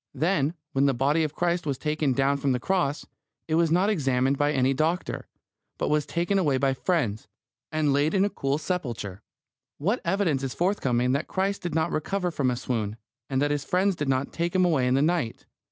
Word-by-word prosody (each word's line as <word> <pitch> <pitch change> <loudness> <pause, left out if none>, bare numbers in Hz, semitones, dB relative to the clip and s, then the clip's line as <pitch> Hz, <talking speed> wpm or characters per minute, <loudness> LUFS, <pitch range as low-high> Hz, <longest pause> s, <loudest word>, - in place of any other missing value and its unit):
Then, 160 -2 +1 0.2
when 135 +1 +2
the 135 - +2
body 145 +6 +2
of 155 -1 -3
Christ 175 -2 0
was 140 -3 -1
taken 150 -2 0
down 135 +2 +2
from 140 -1 +1
the 125 - -1
cross, 160 -2 0 0.4
it 160 - -2
was 165 0 +3
not 180 +5 +3
examined 135 -8 +1
by 145 +1 +1
any 130 -1 +2
doctor, 160 +6 -1 0.5
but - - -1
was 150 -1 +1
taken 175 +4 0
away 145 -7 +2
by 135 0 +2
friends, 130 - -1 0.4
and 155 -2 +1
laid 145 +4 +2
in 195 +1 +4
a - - 0
cool 140 +1 -1
sepulchre. 120 - -4 0.6
What 200 - 0
evidence 170 -6 +1
is 135 -2 -4
forthcoming 130 -10 +1
that 140 +4 0
Christ 195 +1 -1
did 175 -3 -4
not 160 -1 +1
recover 180 +3 -1
from 140 -5 0
a 125 - 0
swoon, 110 -3 -3 0.3
and 130 - 0
that 145 - +1
His 145 -1 -1
friends 185 +5 +1
did 145 -4 -2
not 130 +1 0
take 170 +2 -2
Him 185 -1 +4
away 145 -8 +2
in 125 - +2
the 135 - +3
night? 160 -8 -1
150 Hz, 210 wpm, -26 LUFS, 135-175 Hz, 0.6 s, in